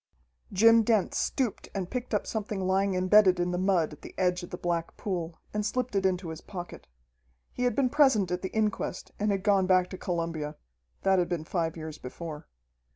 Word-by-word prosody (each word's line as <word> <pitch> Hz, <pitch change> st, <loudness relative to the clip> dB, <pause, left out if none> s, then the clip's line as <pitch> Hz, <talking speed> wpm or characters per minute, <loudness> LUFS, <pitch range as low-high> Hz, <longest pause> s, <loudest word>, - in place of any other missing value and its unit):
Jim 230 Hz, +4 st, +6 dB
Dent 220 Hz, -3 st, +2 dB
stooped 255 Hz, -6 st, -1 dB
and 185 Hz, -2 st, -3 dB
picked 250 Hz, -1 st, -4 dB
up 210 Hz, -, 0 dB
something 210 Hz, -2 st, -3 dB
lying 190 Hz, +1 st, +2 dB
imbedded 185 Hz, 0 st, +5 dB
in 175 Hz, 0 st, 0 dB
the 180 Hz, -, -1 dB
mud 185 Hz, -5 st, +2 dB
at 150 Hz, -, -14 dB
the -, -, -11 dB
edge 180 Hz, -1 st, +1 dB
of 175 Hz, -, -8 dB
the 180 Hz, -, -6 dB
black 170 Hz, -2 st, -2 dB
pool, 175 Hz, -4 st, -4 dB
and 210 Hz, 0 st, -1 dB
slipped 250 Hz, +1 st, -2 dB
it 190 Hz, -1 st, +3 dB
into 180 Hz, -2 st, -2 dB
his 160 Hz, -, -7 dB
pocket. 175 Hz, -3 st, -8 dB, 0.7 s
He 250 Hz, -, -1 dB
had 245 Hz, -3 st, +1 dB
been 255 Hz, -2 st, +2 dB
present 265 Hz, -, +4 dB
at 180 Hz, 0 st, -1 dB
the 190 Hz, -, -3 dB
inquest 215 Hz, -2 st, -2 dB
and 210 Hz, +1 st, +1 dB
had 195 Hz, -2 st, 0 dB
gone 200 Hz, -3 st, +3 dB
back 185 Hz, -1 st, +3 dB
to 185 Hz, -, -7 dB
Columbia. 165 Hz, -4 st, -3 dB, 0.5 s
That 190 Hz, -1 st, +4 dB
had 175 Hz, -, 0 dB
been 170 Hz, -3 st, -2 dB
five 165 Hz, -1 st, -2 dB
years 155 Hz, -1 st, -7 dB
before. 150 Hz, +4 st, -7 dB
185 Hz, 205 wpm, -28 LUFS, 175-210 Hz, 0.7 s, Jim